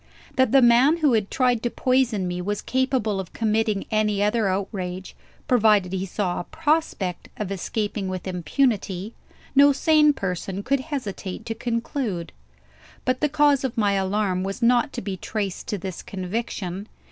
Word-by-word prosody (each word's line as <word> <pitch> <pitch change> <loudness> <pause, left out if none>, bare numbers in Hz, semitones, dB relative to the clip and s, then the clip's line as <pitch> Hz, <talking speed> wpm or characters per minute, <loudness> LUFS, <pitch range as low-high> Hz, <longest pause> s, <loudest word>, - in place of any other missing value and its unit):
That 260 0 +3
the 270 -1 +6
man 245 +7 +5
who 300 -6 +3
had 215 -3 +1
tried 250 -3 +2
to 240 - 0
poison 250 -7 +1
me 180 0 -3
was 205 +3 -3
capable 255 -6 0
of 185 -2 -6
committing 220 -2 0
any 210 -2 +1
other 210 0 +2
outrage, 185 -1 -3 0.3
provided 210 -6 +3
he 190 0 -2
saw 185 -1 -2
a - - -3
prospect 300 - -1
of 205 -2 -4
escaping 205 +1 -2
with 185 0 -5
impunity, 195 - -1 0.4
no 285 +1 +7
sane 300 +1 +4
person 190 -2 -4
could 275 +4 +1
hesitate 225 -8 -5
to 230 - -2
conclude. 230 - -3 0.7
But 255 0 +1
the 300 - +2
cause 290 -1 +3
of 260 -3 -3
my 205 -2 +3
alarm 195 -1 0
was 195 +4 -4
not 240 +2 +3
to 240 - -5
be 195 -2 -4
traced 200 -1 -4
to 205 - -2
this 185 -2 -6
conviction. 195 0 -4
215 Hz, 160 wpm, -24 LUFS, 190-255 Hz, 0.7 s, no